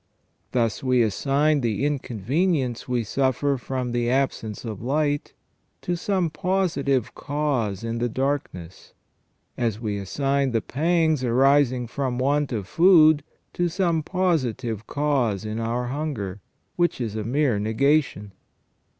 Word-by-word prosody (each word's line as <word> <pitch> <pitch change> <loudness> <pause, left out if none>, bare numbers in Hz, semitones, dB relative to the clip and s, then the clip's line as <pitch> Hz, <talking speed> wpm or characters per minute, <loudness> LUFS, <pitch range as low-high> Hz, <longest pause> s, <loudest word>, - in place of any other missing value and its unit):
Thus 115 -3 0
we 125 -2 +3
assign 140 +7 +1
the 115 +2 0
inconvenience 135 - -1
we 125 -2 0
suffer 135 +4 0
from 125 -1 -3
the 120 0 0
absence 125 -5 -1
of 110 -4 -6
light 145 +3 -1 0.5
to 175 - -1
some 180 -2 -1
positive 150 - 0
cause 130 -9 -2
in 115 0 -3
the 120 +1 0
darkness; 115 - -4 0.6
as 115 -3 0
we 105 -3 -3
assign 135 +6 0
the 115 - +1
pangs 160 -1 +1
arising 130 0 +3
from 125 +1 -3
want 140 +2 +1
of 105 -6 -3
food 155 - +5 0.3
to 175 - 0
some 170 -2 +1
positive 130 - -1
cause 130 -9 0
in 110 +1 -3
our 120 +2 -2
hunger, 125 -10 -4 0.4
which 175 -4 +1
is 110 -4 -3
a 110 - -2
mere 125 -1 +1
negation. 110 -1 +1
130 Hz, 130 wpm, -24 LUFS, 115-150 Hz, 0.6 s, food